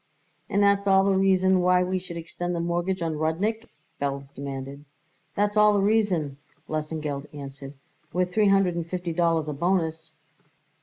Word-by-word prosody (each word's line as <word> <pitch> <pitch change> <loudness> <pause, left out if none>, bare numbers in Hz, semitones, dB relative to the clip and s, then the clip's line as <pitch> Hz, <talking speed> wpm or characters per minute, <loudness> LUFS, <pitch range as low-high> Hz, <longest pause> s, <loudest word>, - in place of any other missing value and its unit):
"And 200 +1 +2
that's 200 0 +3
all 195 0 +5
the 195 0 +2
reason 190 -1 +3
why 180 0 +4
we 185 +1 -1
should 175 -2 -8
extend 175 +1 -4
the - - -2
mortgage 175 +2 -1
on 160 -2 -2
Rudnik?" 205 +9 -1 0.3
Belz 140 0 -3
demanded. 140 0 -6 0.5
"That's 205 +1 +1
all 210 0 +6
the - - +3
reason," 190 -10 +1 0.3
Lesengeld 155 -2 -3
answered; 140 0 -9 0.4
"with 180 0 -1
three 215 0 +3
hundred 195 -2 +3
and 170 -1 -4
fifty 175 -1 -3
dollars 165 -2 +1
a 150 - -2
bonus." 160 0 -1
175 Hz, 160 wpm, -26 LUFS, 155-190 Hz, 0.5 s, all